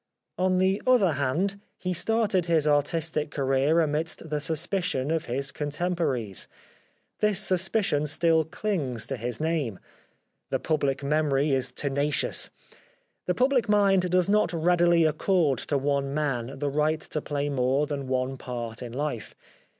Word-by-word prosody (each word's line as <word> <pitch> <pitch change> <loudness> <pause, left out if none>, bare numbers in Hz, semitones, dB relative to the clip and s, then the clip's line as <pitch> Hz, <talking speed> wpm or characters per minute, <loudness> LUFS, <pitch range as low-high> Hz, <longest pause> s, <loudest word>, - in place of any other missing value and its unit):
On 185 0 +2
the 190 +2 +2
other 235 -9 +5
hand, 170 +9 -1 0.2
he 180 0 -2
started 200 -2 +1
his 160 -3 +2
artistic 150 +1 +1
career 140 +3 +2
amidst 155 0 -1
the 150 - 0
suspicion 160 -1 -1
of 165 -1 0
his 135 +3 -2
con 145 -1 -4
temporaries. 145 - -2 0.7
This 210 -2 +2
suspicion 185 -5 +1
still 160 +1 +2
clings 155 - -3
to 135 - -3
his 120 -1 -5
name. 155 - -1 0.7
The - - +1
public 140 -3 -1
memory 145 0 +1
is 130 -2 +1
tenacious. 140 +1 -1 0.8
The 180 - +1
public 255 -3 +2
mind 195 -3 +3
does 180 0 +2
not 205 -4 +2
readily 170 0 +3
accord 155 - +2
to 145 - +2
one 140 0 -1
man 135 -3 -2
the 145 0 -2
right 155 +2 +1
to 155 - -3
play 145 0 -2
more 135 +1 +1
than 140 -2 -4
one 130 +1 -1
part 120 -2 -5
in 120 -2 -7
life. 140 -4 -4
150 Hz, 145 wpm, -26 LUFS, 135-180 Hz, 0.8 s, other